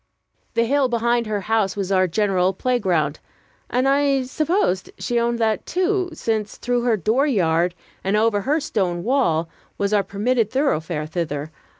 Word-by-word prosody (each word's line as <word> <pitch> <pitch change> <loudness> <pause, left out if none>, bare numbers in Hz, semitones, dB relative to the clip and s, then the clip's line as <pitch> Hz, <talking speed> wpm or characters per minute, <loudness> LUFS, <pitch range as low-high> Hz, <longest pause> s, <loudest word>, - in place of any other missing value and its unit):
The 230 - +3
hill 275 +1 +2
behind 235 0 +1
her 210 -1 -2
house 215 -2 0
was 195 -1 -2
our 185 -1 +3
general 190 0 +1
playground; 185 - 0 0.5
and 255 +2 +1
I 275 -1 +2
supposed 275 - 0
she 240 -1 -1
owned 235 0 0
that, 220 -2 0
too, 370 +1 0
since 220 -8 -2
through 245 0 0
her 235 -2 +2
dooryard, 185 - +1 0.3
and 195 +2 +1
over 215 -1 +2
her 295 +8 +1
stone 185 - -1
wall, 190 - +1 0.3
was 200 +1 0
our 205 - +4
permitted 215 +4 0
thoroughfare 170 - -1
thither. 155 -2 -4
220 Hz, 155 wpm, -22 LUFS, 185-255 Hz, 0.5 s, our